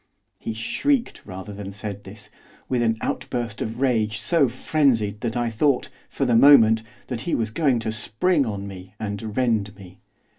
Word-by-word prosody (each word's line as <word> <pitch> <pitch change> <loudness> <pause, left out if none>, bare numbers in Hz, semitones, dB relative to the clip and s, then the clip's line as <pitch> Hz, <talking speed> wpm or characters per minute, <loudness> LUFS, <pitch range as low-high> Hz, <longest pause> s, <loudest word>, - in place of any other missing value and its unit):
He 115 - -4
shrieked, 235 - -1
rather 95 +1 -7
than 100 -1 -7
said 100 0 -7
this, 105 +2 -11 0.4
with 125 -2 0
an 115 -1 +1
outburst 120 -4 -3
of 115 +3 -4
rage 110 -5 +1
so 145 +2 +3
frenzied 115 -8 +1
that 115 -1 -2
I 120 -1 0
thought, 130 +4 +1 0.2
for 135 - -1
the 120 -2 +3
moment, 115 -4 +7 0.2
that 120 -3 -4
he 170 - -1
was 110 -2 -1
going 135 -1 +2
to 110 - -2
spring 125 +9 +1
on 100 -4 -4
me 95 0 -10
and 105 0 -5
rend 110 -5 +1
me. 95 -2 -14
110 Hz, 175 wpm, -23 LUFS, 105-125 Hz, 0.4 s, moment